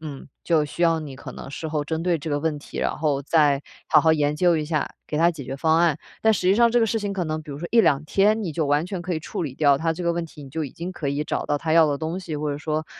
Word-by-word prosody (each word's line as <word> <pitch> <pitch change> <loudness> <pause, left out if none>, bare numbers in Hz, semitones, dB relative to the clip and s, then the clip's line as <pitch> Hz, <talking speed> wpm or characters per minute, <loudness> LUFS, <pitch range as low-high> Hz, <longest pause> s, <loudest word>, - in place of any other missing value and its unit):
嗯， 145 -3 -8 0.2
就 160 -3 +3
需 150 +3 -9
要 165 -1 +3
你 145 -3 -7
可 - - -9
能 - - -9
事 145 +3 -5
后 150 -1 -1
针 160 +1 -3
对 175 -2 +2
这 155 +1 -5
个 145 - +1
问 155 0 -1
题， - - -9
然 - - -1
后 150 -3 0
再 145 -1 +3 0.3
好 155 - +6
好 160 +1 +4
研 150 -1 +1
究 175 0 +3
一 155 - -1
下 155 -1 -2
给 150 - -3
他 170 +1 +5
解 150 -6 -8
决 135 +2 -5
方 160 +3 +2
案， 165 -3 +3 0.2
但 220 0 +5
实 205 - -1
际 185 +2 +4
上 235 +1 +5
这 240 - +3
个 225 - +3
事 225 +1 0
情 205 -1 -2
可 185 -3 -2
能 155 0 -3
比 150 - -11
如 140 - -6
说 170 - -5
1-2 155 -12 +4
天 210 +6 +2
你 170 - -3
就 160 +1 -1
完 145 +4 +1
全 185 -2 -5
可 180 0 -3
以 160 - 0
处 165 - -5
理 135 -5 -4
掉 145 -2 +4
他 160 +3 0
这 175 +2 -6
个 170 - +2
问 170 0 -2
题， 155 -2 -12
你 - - -11
就 160 +3 -3
已 135 - -6
经 175 +2 -6
可 145 -5 -4
以 145 +2 -1
找 - - -2
到 145 0 0
他 160 0 -2
要 165 -1 +7
的 145 -1 -1
东 160 +3 -3
西， 160 -4 -5
或 150 0 -2
者 145 - -3
说 155 0 -2
160 Hz, 340 characters per minute, -24 LUFS, 145-170 Hz, 0.3 s, 要